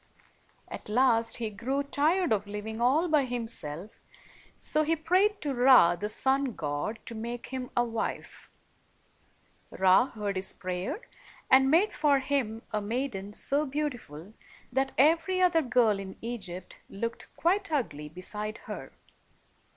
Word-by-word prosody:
At - - -9
last, 230 0 +3
he 225 -2 -3
grew 260 +7 -2
tired 300 +2 +1
of 205 -1 -1
living 210 +2 -5
all 285 +8 +3
by 305 -4 +3
himself, 220 -7 -4 0.6
so 305 - +1
he 315 +2 +1
prayed 370 +6 +2
to 290 -2 -2
Ra, 245 -9 +6
the 205 +4 -4
sun 265 +2 +1
god, 150 +9 -3
to 235 - -6
make 235 +2 -6
him 260 -1 -5
a 240 - +5
wife. 230 -1 -5 1.2
Ra 190 +6 +4
heard 205 -5 -4
his 190 0 +1
prayer, 185 - -4 0.5
and 265 0 +6
made 350 +8 +3
for 295 -2 +3
him 260 -5 -1
a 215 - -1
maiden 205 -2 -3
so 280 +7 0
beautiful 245 - -5 0.4
that 270 +1 +1
every 330 +6 +3
other 355 -3 +4
girl 235 -6 +2
in 190 -1 -8
Egypt 195 -6 -6
looked 230 +4 -5
quite 385 +2 +1
ugly 150 - -2
beside 210 +6 -5
her. - - -7
240 Hz, 140 wpm, -29 LUFS, 210-285 Hz, 1.2 s, Ra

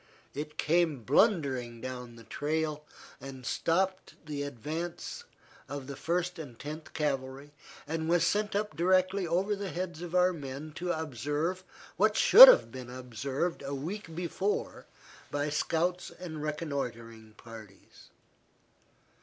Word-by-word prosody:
It 150 +2 -6
came 160 -5 +1
blundering 135 - +2
down 125 -1 -7
the 115 - -13
trail, 150 +5 -2 0.4
and 130 -2 -9
stopped 185 +7 0
the 150 -2 -4
advance 155 - -5 0.4
of 140 -2 -5
the 140 +1 -7
First 180 +3 -2
and 130 -7 -8
Tenth 155 +4 -8
Cavalry, 140 -1 -3 0.3
and 160 +1 -3
was 170 -1 +4
sent 205 +4 0
up 205 -6 -1
directly 185 +2 +2
over 190 +5 +1
the 200 -1 -5
heads 175 -2 -4
of 175 0 -5
our 180 0 +4
men 145 0 -7
to 175 0 -2
observe 155 - -2 0.3
what 215 +3 +3
should - - +12
have - - +6
been 130 -2 -8
observed 130 +6 -3
a 140 0 -4
week 165 +4 -6
before 180 +4 -2 0.4
by 145 +1 -2
scouts 170 +4 0
and 165 -4 -8
reconnoitring 120 -8 -5
parties. 110 -4 -14
155 Hz, 130 wpm, -30 LUFS, 135-175 Hz, 0.4 s, should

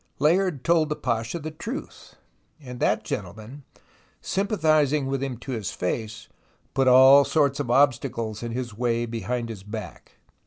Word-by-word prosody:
Layard 165 -1 +1
told 165 -2 +2
the 150 - -1
Pasha 115 +2 -2
the 155 -1 -6
truth, 220 - -8 0.4
and 125 -4 -9
that - - +1
gentle - - -5
man, 115 +7 -11 0.6
sympathizing 155 -8 +1
with 135 0 -2
him 135 -3 -3
to 125 +3 -8
his 110 -6 -3
face, 110 +4 -4 0.5
put 135 -1 +1
all 130 +2 +8
sorts 140 -2 +1
of 140 -5 -3
obstacles 120 -4 +1
in 120 -1 -5
his 120 -2 -5
way 120 0 0
behind 115 +1 -3
his 110 -4 -7
back. 105 -3 -9
130 Hz, 155 wpm, -25 LUFS, 115-150 Hz, 0.6 s, all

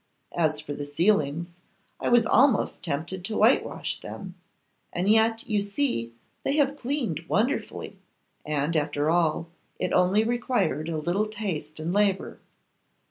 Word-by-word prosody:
As 155 -3 +1
for 150 -1 -5
the 145 0 -5
ceilings, 165 0 +1 0.5
I - - -1
was 240 -2 +5
almost 250 -2 +3
tempted 170 +3 -3
to 215 +3 -3
whitewash 225 +5 +2
them, 190 -2 -8 0.6
and 180 +2 -1
yet 225 +1 +3
you 210 -2 +1
see 200 - -1 0.3
they 275 - 0
have 285 -2 +2
cleaned 245 - -2
wonderfully; 230 +9 -1 0.4
and, 150 +2 -1
after 150 0 +1
all, 165 -1 +1 0.3
it - - -2
only 190 +4 +4
required 240 - 0
a 160 - -2
little 175 +7 0
taste 180 -9 -4
and 165 +3 -2
labour. 200 -2 +1
185 Hz, 135 wpm, -26 LUFS, 155-220 Hz, 0.6 s, was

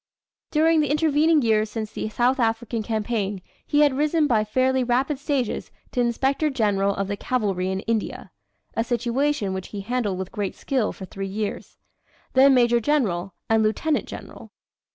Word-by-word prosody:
During 320 +1 +3
the 295 -3 +1
intervening 305 0 +3
years 215 -1 +2
since 215 -1 -5
the - - -4
South 245 +4 +1
African 225 0 0
campaign 210 -2 -2 0.3
he 295 - +3
had 290 -2 +5
risen 300 +2 +2
by 230 -6 +2
fairly 255 +4 +1
rapid 260 +4 0
stages 280 -5 -2 0.2
to 250 - 0
Inspector 270 +5 +1
General 200 -6 +1
of 195 - -2
the 200 - -2
Cavalry 200 -6 -1
in 190 0 -2
India 225 -1 -3 0.4
a 225 - +1
situation 240 -2 0
which 190 -1 -5
he 205 - -6
handled 215 -3 -1
with 190 0 -5
great 205 -2 -3
skill 255 -6 -1
for 190 - -9
three 195 +1 -6
years 205 +2 -5 0.6
then 270 +1 +6
Major 240 -1 +4
General, 210 -9 0
and 225 0 +3
Lieutenant 250 +8 0
General. - - -10
235 Hz, 165 wpm, -24 LUFS, 210-275 Hz, 0.6 s, then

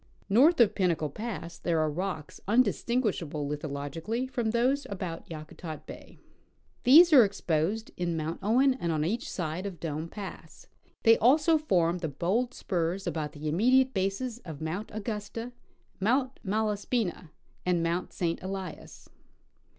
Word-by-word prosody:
North 280 - +6
of 230 -4 +5
Pinnacle 170 -6 0
pass 180 -5 -6
there 170 -2 0
are 155 - +2
rocks 170 -2 -4
undis 240 +5 +3
tinguishable 190 - -1
lithogically 150 - -3
from 240 -3 -1
those 255 +5 +1
about 185 -4 -5
Yakutat 155 0 -8
bay. - - -11 0.7
These 320 +6 +8
are 260 -5 +10
exposed 195 +2 -1
in 170 -2 -1
Mount 160 +1 -3
Owen 250 +7 +4
and 175 -10 -2
on 155 -1 0
each 220 +8 -2
side 175 +2 -3
of 180 -5 -8
Dome 160 0 -4
pass; 200 0 -9 0.4
they 225 -1 +6
also 305 +6 +4
form 180 - +1
the 165 -2 -3
bold 195 - -1
spurs 180 +1 -2
about 150 -2 -3
the 150 +1 -6
immediate 255 - +3
bases 200 +5 -2
of 160 - -9
Mount 160 +7 -4
Augusta, 215 +2 -5 0.5
Mount 255 +6 +1
Malaspina, 210 -3 -1 0.3
and 175 -2 +1
Mount 170 +2 -1
St. 170 -2 -2
Elias. 190 -2 -7
190 Hz, 145 wpm, -29 LUFS, 165-235 Hz, 0.7 s, are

